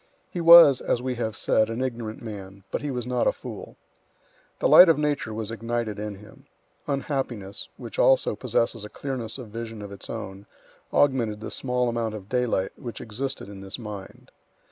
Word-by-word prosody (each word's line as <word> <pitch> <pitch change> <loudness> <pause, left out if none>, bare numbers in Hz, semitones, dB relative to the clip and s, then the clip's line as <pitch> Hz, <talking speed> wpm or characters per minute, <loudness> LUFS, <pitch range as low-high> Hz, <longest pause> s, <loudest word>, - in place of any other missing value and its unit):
He 175 - -3
was, 165 -5 +9
as - - 0
we 130 +1 -2
have 110 -2 -2
said, 110 +2 +2
an 115 +1 -3
ignorant 120 -4 -4
man, 100 -3 -8
but - - -2
he 145 - -3
was 125 -3 -3
not 125 -1 0
a - - +5
fool. - - -9 0.8
The - - +2
light 180 - +9
of 160 - +5
nature 150 -6 -1
was 110 0 -4
ignited 115 -1 -3
in 105 -1 -4
him. 105 +2 -16 0.4
Unhappiness, 130 -8 -3
which - - -8
also - - +4
possesses 115 -2 0
a 105 - -7
clearness 130 -4 -4
of 125 -5 -9
vision 115 0 -6
of 100 - -8
its 100 -1 -9
own, 100 -3 -7 0.4
augmented 120 -7 +2
the 110 - -6
small 125 -1 0
amount 115 -2 -2
of 100 -1 -10
daylight 125 -6 0
which 120 -4 -7
existed 130 +4 -5
in 100 -1 -10
this 95 +1 -6
mind. 105 -5 -9
115 Hz, 185 wpm, -25 LUFS, 105-130 Hz, 0.8 s, was